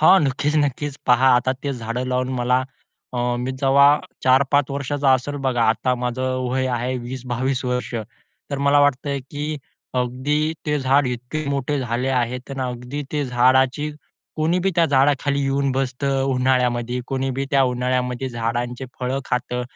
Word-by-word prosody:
हो, 160 +5 +7
नक्कीच, 145 +1 0
नक्कीच. 145 +1 -3
पहा 125 +2 +5
आता 125 +1 +2
ते 140 - -1
झाडं 120 +1 -3
लावून 125 0 0
मला 125 +1 +2 0.5
अ, 125 - -1 0.2
मी 125 +2 -2
जेव्हा 140 +1 +5 0.4
4-5 135 +2 +3
वर्षाचा 140 0 0
असेल 145 +3 -3
बघा. 120 -2 +1
आता 125 +3 +1
माझं 125 +1 -2 0.3
वय 130 0 0
आहे 125 +2 -2
20-22 130 +1 -3
वर्ष, 125 -1 -2 0.6
तर 140 - -2
मला 145 +1 +5
वाटतं 140 0 +1
की 145 0 -5 0.6
अगदी 130 +4 -1 0.3
ते 150 0 +1
झाड 135 +1 +3
इतके 125 +5 -4
मोठे 140 +1 -1
झाले 125 +1 -1
आहेत 125 -1 0
तर 135 -1 -5
अगदी 125 +4 -5
ते 145 -1 0
झाडाची 130 +4 +2 0.5
कोणीबी 175 +5 +1
त्या 170 - +5
झाडाखाली 140 +1 +2
येऊन 135 0 +1
बसतं, 135 +1 -1
उन्हाळ्यामध्ये 125 -1 +1
कोणीबी 135 0 -2
त्या 135 -1 +4
उन्हाळ्यामध्ये 125 +1 -1
झाडांचे 120 +2 -3 0.2
फळं 130 +2 -1
खातं, 125 0 -2
130 Hz, 150 wpm, -22 LUFS, 125-140 Hz, 0.6 s, हो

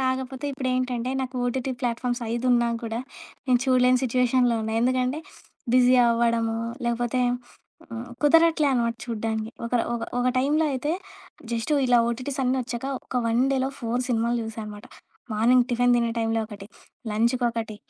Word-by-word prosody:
కాకపోతే 260 +1 -2
ఇప్పుడేంటంటే 255 -2 -1
నాకు 260 0 -4
ఓటిటి 260 +1 -1
ప్లాట్‌ఫామ్స్ 245 0 -1
ఐదున్నా 240 0 +2
గూడా 230 0 -3 0.5
నేను 250 -1 +4
చూడలేని 255 -1 +4
సిచ్యుయేషన్‌లో 250 0 +2
ఉన్నా. 220 0 -3
ఎందుకంటే 255 +3 +1 0.6
బిజీ 255 0 +6
అవ్వడము, 230 -1 +1 0.3
లేకపోతే 240 +1 0 0.7
ఆహ్, 235 +2 -6
కుదరట్లే 320 0 +4
అనమాట 235 -1 0
చూడ్డానికి. 220 -1 -3
ఒకరు 235 0 +1
ఒక 230 - -4 0.2
ఒక 245 - +1
టైంలో 300 +4 +2
అయితే 290 +4 -1 0.6
జస్ట్ 235 +6 -1
ఇలా 245 -1 +5
ఓటీటీస్ 255 +4 -4
అన్నీ 255 +1 +1
ఒచ్చాక 240 +1 -5 0.2
ఒక - - -9
వన్ 230 +3 +2
డేలో 265 0 0
4 235 +2 -1
సినిమాలు 235 0 +1
జూసా 220 0 -6
అనమాట. 210 -1 -9 0.5
మార్నింగ్ 240 +4 +4
టిఫిన్ 245 0 +3
తినే 235 -1 +1
టైంలో 225 0 0
ఒకటి, 205 -2 -10 0.4
లంచుకొకటి, 230 0 0
245 Hz, 140 wpm, -25 LUFS, 230-255 Hz, 0.7 s, బిజీ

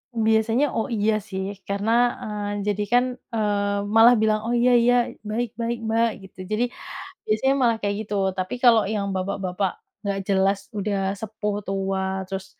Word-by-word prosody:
Biasanya 225 +4 +2
oh 225 +3 0
iya 215 +1 +2 0.2
sih, 190 -1 -3 0.2
karena 200 +2 -1 0.3
eee, 205 -1 -3
jadi 205 0 0
kan, 245 0 +6 0.3
eee, 205 -2 0 0.2
malah 230 +2 +8
bilang 215 -1 +2
oh 240 - +1
iya 245 +1 +4
iya, 245 +1 +4 0.4
baik 235 +2 -1
baik 235 +1 -1
Mbak 230 +1 +3 0.2
gitu. 190 - -15
Jadi 215 +3 +1 0.6
biasanya 220 +6 +2
malah 235 -2 +4
kayak 205 0 -1
gitu 210 - -7 0.2
tapi 185 +5 -2
kalau 230 -3 +6
yang 200 -2 -1
bapak-bapak 190 0 -2 0.3
nggak 200 -1 -1
jelas 195 0 +2 0.2
udah 200 -1 -1 0.2
sepuh, 215 -1 -3
tua, 195 0 -1 0.2
terus 190 0 -5
210 Hz, 155 wpm, -24 LUFS, 200-225 Hz, 0.6 s, malah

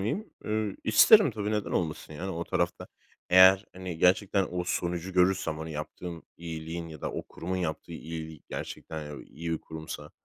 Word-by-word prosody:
miyim? 150 - -2
Iıı, 105 -2 -1
isterim 200 - +7
tabi. 105 -2 -3
Neden 105 -1 -1
olmasın 80 -2 -2
yani 90 +6 -4
o 85 -1 -3
tarafta. - - -1 0.4
Eğer 95 +2 +8
hani 90 -3 -6
gerçekten 95 +2 +3
o 90 0 -2
sonucu 85 +1 -2
görürsem, 90 -3 +2
hani, 80 0 -5
yaptığım 80 +3 -6
iyiliğin 85 0 -5
ya 80 -2 -10
da - - -3
o - - -3
kurumun 90 +3 -5
yaptığı 85 -1 -3
iyiliğin 80 -1 -7
gerçekten 75 -2 -6
iyi 85 +2 -5
bir 80 - -1
kurumsa, 80 -2 -8
85 Hz, 165 wpm, -29 LUFS, 80-95 Hz, 0.4 s, Eğer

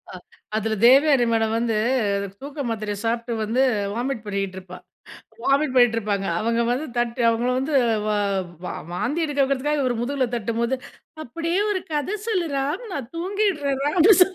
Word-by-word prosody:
அ - - -7 0.4
அதில 220 0 0
தேவயானி 275 -1 +6
மேடம் 225 -1 +1
வந்து, 230 -2 0 0.6
தூக்க 285 +2 -8
மாத்திரைய 215 -2 -3
சாப்ட்டு 235 +1 -1
வந்து, 230 +5 +1 0.3
வாமிட் 245 -2 -2
பண்ணிட்ருப்பா 190 -2 -4 0.7
வாமிட் 275 -1 +2
பண்ணிட்டுருப்பாங்க. 225 -5 +2
அவங்க 230 +2 0
வந்து 265 +6 -1
தட்டு 240 +1 -1
அவங்கள 230 +2 +1
வந்து 280 +3 -2 0.3
வ - - 0 0.6
வ - - -3 0.3
வாந்தி 290 - -1
எடுக்க 290 -2 -2
வெக்கிறதுக்காக, 280 +2 0
இவரு 250 -2 0
முதுகுல 265 +1 0
தட்டும்போது, 235 +2 -1 0.5
"அப்டியே 335 +7 -2
ஒரு 390 -2 0
கத 300 +8 -1
சொல்லு 375 -7 0
ராம் 280 - -2
நான் 265 -6 -5
தூங்கிடுறேன் 340 -7 0
ராம்" 295 +5 0
அப்டி 410 +6 +8
சொல், 370 +1 +2
255 Hz, 150 wpm, -23 LUFS, 230-295 Hz, 0.7 s, அப்டி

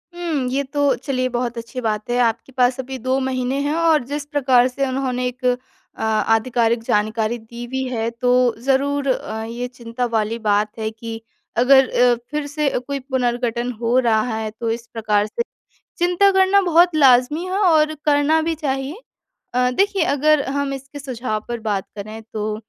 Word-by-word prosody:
हुँ, 325 -7 -2
ये 275 +2 0
तो 285 +1 +1
चलिए 255 -2 -2
बहुत 240 -1 -2
अच्छी 230 +3 -6
बात 215 -2 -2
है 240 - +1
आपके 235 +2 0
पास 250 0 +3
अभी 260 0 -5
2 260 +2 0
महीने 260 0 -1
हैं 290 +1 0
और 325 -4 +3
जिस 290 0 -3
प्रकार 260 -4 +3
से 270 +2 -2
उन्होंने 255 -1 -1
एक 250 +1 -6
अ, 250 0 +4 0.5
आधिकारिक 225 +2 +1
जानकारी 215 +2 0
दी 235 +2 -9
भी 265 +2 -2
है, 230 -2 -1
तो 245 0 +2
ज़रूर 280 +1 +1
अ, 220 -4 -2
ये 235 +2 -4
चिंता 245 0 -4
वाली 225 -1 -1
बात 210 -1 +1
है 220 0 -1
कि 225 0 -7 0.4
अगर 265 +2 +5
अ, 245 0 +4 0.2
फिर 300 -1 -2
से 290 0 0
अ, - - -2
कोई 275 +3 -4
पुनर्गठन 245 -2 -1
हो 235 +2 +2
रहा 225 -3 +3 0.2
है 220 -1 -3
तो 230 - -2
इस 230 +1 -5
प्रकार 210 -2 +1
से 215 - -4 0.6
चिंता 355 +3 +4
करना 385 +1 +4
बहुत 345 -1 +4
लाज़मी 270 +3 +4
है 375 +1 -2
और 315 -6 +3
करना 295 +2 +3
भी 325 +1 -1
चाहिए। 275 0 -3 0.6
अ, 250 0 +2
देखिए 395 +5 +1
अगर 300 0 +3
हम 280 0 -1
इसके 270 +2 -8
सुझाव 245 -5 -3
पर 240 -1 -4
बात 205 -3 -2
करें 215 +2 -7
तो 215 0 -2
250 Hz, 180 wpm, -20 LUFS, 230-285 Hz, 0.6 s, अगर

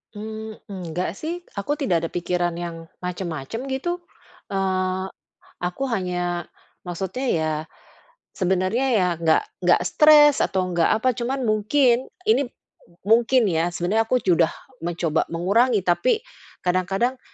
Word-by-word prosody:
Mmm, 220 +1 -7
enggak 180 -2 -3
sih, 345 +3 -4 0.2
aku 290 +9 -1
tidak 175 - 0
ada - - -14
pikiran 175 -1 -1
yang 165 -1 -6 0.2
macem-macem 180 - -4
gitu, 345 +7 -2 0.5
eee, 185 -1 0 0.6
aku 180 +10 -2
hanya 180 -5 -2 0.4
maksudnya 190 +8 -4
ya 160 -1 0 0.8
sebenernya 190 +7 +1
ya 205 -7 +3
nggak 160 -1 +3 0.2
nggak - - +4
stres 300 -2 +6
atau 185 -1 0
nggak 170 -1 +3
apa. 255 +1 +3
Cuman 250 +3 -2
mungkin 235 +4 +2 0.2
ini 425 - +3
m - - -34 0.5
mungkin 235 +3 +4
ya, 170 -3 +1
sebenernya 200 +6 0
aku 255 - +3
sudah 170 -3 +4 0.3
mencoba 170 -2 -1
mengurangi, 200 +5 +2
tapi 180 - +2 0.4
kadang-kadang, 195 +8 0
190 Hz, 125 wpm, -23 LUFS, 175-245 Hz, 0.8 s, stres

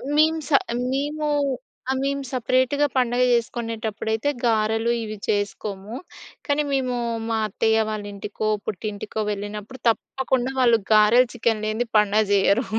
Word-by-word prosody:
మేం 315 +1 +4
స - - -9 0.4
మేము 295 +2 -1 0.6
ఆ - - +3
మేము 280 0 -1
సెపరేట్‌గా 260 +3 +2
పండగ 250 -1 +2
చేసుకునేటప్పుడైతే 225 0 -1 0.2
గారెలు 225 0 +2
ఇవి 215 -1 -6
చేసుకోము. 205 0 -2 0.5
కానీ 290 0 +1
మేము 260 -2 0 0.3
మా 225 - +1
అత్తయ్య 220 +2 +1
వాళ్ళ 215 -1 -3
ఇంటికో, 210 +2 -4 0.2
పుట్టింటికో 210 +2 -4
వెళ్ళినప్పుడు 210 +4 -6
తప్పకుండా 260 +2 -1
వాళ్ళు 235 -3 +5
గారెలు, 215 +4 +6
చికెన్ 225 -2 0
లేనిది 220 +3 -1
పండగ 210 +1 +4
జేయరు. 200 +4 +3
225 Hz, 120 wpm, -23 LUFS, 215-255 Hz, 0.6 s, గారెలు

